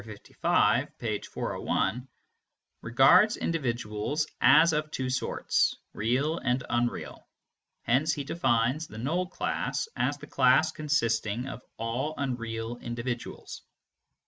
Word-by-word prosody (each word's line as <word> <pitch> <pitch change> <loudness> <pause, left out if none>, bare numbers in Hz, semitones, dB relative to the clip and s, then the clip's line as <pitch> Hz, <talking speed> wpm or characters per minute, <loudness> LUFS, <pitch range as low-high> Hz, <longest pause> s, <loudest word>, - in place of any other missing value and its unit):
55, 110 -2 0
page - - -3
401) 125 +3 -2 0.7
regards 155 - +5
individuals 125 -1 -2 0.2
as 165 -1 +6
of 155 0 -1
two 130 -3 -3
sorts, 130 - +1 0.2
real 135 +9 0
and 125 0 0
unreal; 120 0 -2 0.6
hence 135 +7 +2
he 145 - -3
defines 130 0 0
the 110 - -11
null 165 +10 -1
class 185 - -2
as - - 0
the - - -10
class - - +3
consisting 120 -6 -1
of 130 - -7 0.2
all 120 +7 -2
unreal 120 -3 -3
individuals. 120 0 -6
125 Hz, 110 wpm, -28 LUFS, 115-150 Hz, 0.7 s, as